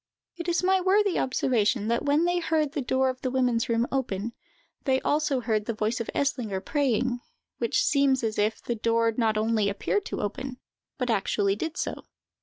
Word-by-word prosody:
It 345 0 -4
is 345 +1 +1
worthy 380 +1 +3
of - - +2
observation, 240 -4 +1
that 235 +4 +1
when 295 +3 +3
they 350 0 +1
heard 315 -3 0
the 290 - -2
door 260 +1 +1
of 255 0 -5
the 260 - -1
women's 250 -2 +1
room 230 0 +2
open, 235 -4 -2 0.5
they 265 -2 +3
also 295 -3 +1
heard 220 -3 0
the 230 - -2
voice 215 +3 -1
of 230 - -4
Eslinger 235 -8 -1
praying, 250 +1 0 0.4
which 235 - +1
seems 275 -3 +3
as 220 -2 -1
if 215 +2 0
the 240 - -1
door 230 0 +1
not 220 -3 +1
only 215 -1 +2
appeared 375 - -1
to - - -4
open, 250 +5 -4 0.4
but 250 -2 0
actually 200 -1 +1
did 325 - -4
so. - - -4
250 Hz, 190 wpm, -27 LUFS, 225-285 Hz, 0.5 s, worthy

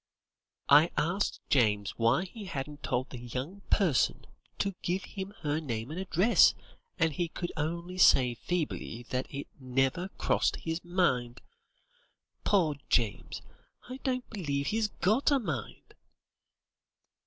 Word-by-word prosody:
"I 150 +4 +7
asked 180 +6 0
James 105 -6 +3
why 115 +8 +2
he 205 +3 -9
hadn't 145 -3 -5
told 125 +2 -2
the 125 - -7
'young 130 - -6
person' 175 - +2 0.3
to 200 - -1
give 185 +3 -1
him 195 -1 -6
her 150 -1 0
name 120 -3 -4
and 165 - -4
address, 190 +4 +4 0.4
and 160 -2 +2
he 175 +3 -1
could 175 +1 -5
only 170 +4 -3
say 125 -8 +6
feebly 150 -4 -3
that 130 0 -2
'it 140 +1 -5
never 135 +7 0
crossed - - +1
his 160 +1 -4
mind.' 150 -10 0 1.0
Poor 165 -8 +2
James, 115 -4 0 0.5
I 255 - -5
don't 255 -2 -2
believe 145 -9 -2
he's 220 0 +1
got 215 +7 +1
a 285 - +4
mind." 160 - -5
160 Hz, 130 wpm, -30 LUFS, 130-190 Hz, 1.0 s, I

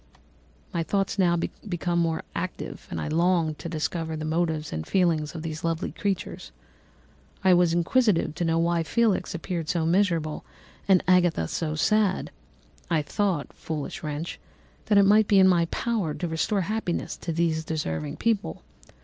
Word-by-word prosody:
"My 170 - 0
thoughts 195 +4 -1
now 175 -2 +4
became 175 -1 -2
more 165 -1 0
active, 185 +1 -5
and - - -4
I - - -3
longed 165 -1 +1
to 170 - -5
discover 160 0 -2
the 155 - -4
motives 160 -1 -1
and 80 0 -3
feelings 170 -4 +1
of 160 - -5
these 155 -2 -5
lovely 165 +1 -1
creatures; 195 - -3 0.9
I 190 -1 +6
was 175 -1 +4
inquisitive 175 -1 +2
to 175 - -3
know 165 -1 +1
why 170 0 +2
Felix 200 0 +1
appeared 170 -1 -4
so 170 -2 +1
miserable 165 -4 +1 0.4
and 190 -2 +5
Agatha 175 - +3
so 155 - -2
sad. 205 +3 +1 0.6
I 160 -3 +2
thought 185 -2 -1
(foolish 155 -3 -5
wretch!) 150 +2 -4 0.5
that 210 - +4
it 200 - +7
might 210 +1 +5
be 200 - +4
in 190 -1 +7
my 175 -2 +4
power 195 -3 -2
to 175 - -3
restore 165 +5 0
happiness 200 -1 -2
to 170 - -4
these 160 -1 0
deserving 80 - -3
people. 220 - -1
170 Hz, 160 wpm, -26 LUFS, 160-190 Hz, 0.9 s, it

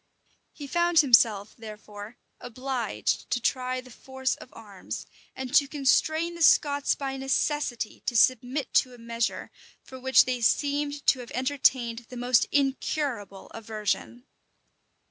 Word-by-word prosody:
He 290 - -9
found 345 +3 +3
himself, 225 -6 +3
therefore, 215 0 -10 0.2
obliged 245 -1 -3
to 250 - 0
try 255 +1 -1
the 255 0 -16
force 265 +2 -3
of - - -11
arms, 205 -4 -8 0.3
and 260 0 -6
to 285 -1 +5
constrain 315 +4 +1
the 340 - -9
Scots 285 -2 +4
by 270 -1 -4
necessity 270 -3 -2
to 240 - +1
submit 255 +3 +1
to 255 -1 +2
a - - -16
measure 230 0 -3 0.3
for 260 - -11
which 260 +1 +5
they 250 -1 -2
seemed 285 +4 0
to 260 - +4
have 245 - -9
entertained 255 -3 0
the 250 - -9
most 245 0 +2
incurable 270 -7 -2
aversion. 225 +2 -4
255 Hz, 135 wpm, -26 LUFS, 230-280 Hz, 0.3 s, to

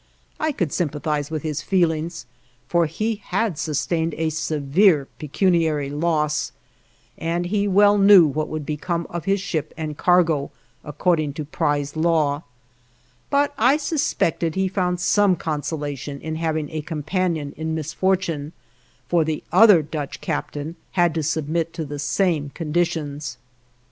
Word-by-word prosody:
I 315 0 +1
could 175 - -2
sympathize 150 -2 -1
with 155 -2 -4
his 155 -1 -2
feelings, 170 -3 0 0.4
for 170 -2 +2
he 215 +7 -2
had 210 -9 -1
sustained 160 +1 -1
a 160 0 0
severe 155 +1 +2
pecuniary 155 -2 +1
loss, 150 -1 0 0.7
and 170 +2 -1
he 205 +2 0
well 205 +1 +5
knew 195 -3 +8
what 155 +1 -1
would 155 -2 -5
become 170 +3 -2
of 170 -2 -5
his 195 +1 +2
ship 155 -5 -3
and 155 -2 -4
cargo 165 -4 +2 0.3
according 155 -1 0
to 150 0 -5
prize 145 0 -1
law, 155 -3 +1 0.9
but 285 0 +2
I 255 +6 +5
suspected 175 - 0
he 190 0 +1
found 180 -2 -1
some 195 +1 +3
consolation 145 -3 -4
in 160 +1 -4
having 160 -2 -2
a 155 -1 -3
companion 160 -1 -2
in 160 +1 -3
misfortune, 160 -1 -1 0.5
for 170 -2 +3
the 155 0 -3
other 195 -4 +7
Dutch 150 -1 -5
captain 150 +3 -4 0.2
had 175 -3 +3
to 160 - -1
submit 160 +2 -1
to 165 -2 -4
the 145 0 -6
same 155 -1 0
conditions. 155 -4 -2
160 Hz, 140 wpm, -22 LUFS, 150-180 Hz, 0.9 s, knew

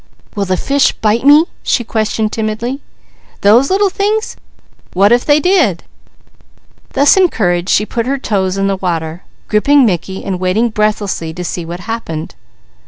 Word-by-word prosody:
"Will 200 -1 -1
the 185 -1 -1
fish 280 +6 +1
bite 220 +4 0
me?" 300 +3 +7 0.2
she 240 - 0
questioned 220 -1 -1
timidly. 225 +5 -3 0.6
"Those 230 +7 +4
little 390 0 +2
things! 425 +3 -1 0.6
What 200 +4 +3
if 240 0 +3
they 290 0 +4
did?" 310 - +1 1.1
Thus 285 +6 +4
encouraged 185 - +1
she 210 - +2
put 230 +2 -3
her 275 +1 0
toes 195 -7 -1
in 195 - 0
the 195 0 0
water, 165 -2 -3 0.3
gripping 275 +6 +3
Mickey 190 -1 -3
and 185 -2 -3
waiting 190 +6 +1
breathlessly 205 -6 -2
to 180 - -5
see 175 0 -4
what 175 +2 -7
happened. 175 -7 -5
215 Hz, 155 wpm, -14 LUFS, 185-270 Hz, 1.1 s, me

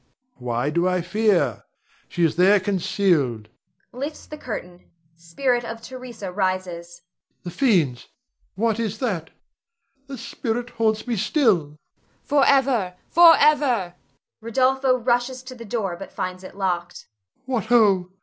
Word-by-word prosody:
Why 125 +3 -2
do 170 +3 +1
I 180 -1 +1
fear? 180 - +1 0.5
She 175 - -1
is 165 - +2
there 190 +4 +5
concealed 170 - 0 0.4
[lifts 285 +5 -6
the 305 - -9
curtain; 180 -11 -8 0.3
spirit 240 +10 -1
of 225 -1 -6
Theresa 240 -5 -8
rises]. 180 -3 -3 0.4
The 175 - -6
fiends! 170 - +1 0.5
what 225 +1 0
is 220 -2 -2
that? 195 -10 -3 0.8
The 275 -1 -7
spirit 235 +1 -4
haunts 220 -1 0
me 240 -3 -2
still! 215 - +2
Voice. 145 +1 -17 0.7
Forever, 250 -10 +2 0.2
forever 290 - +5 0.5
Rod. 255 +1 +1
[rushes 250 +1 0
to 255 0 -9
the 235 -2 -10
door 200 -5 -2
but 195 - -9
finds 185 0 -5
it 185 - -11
locked]. 175 -3 -3 0.4
What 245 -5 -2
ho! 205 -6 +4
210 Hz, 130 wpm, -23 LUFS, 175-245 Hz, 0.8 s, there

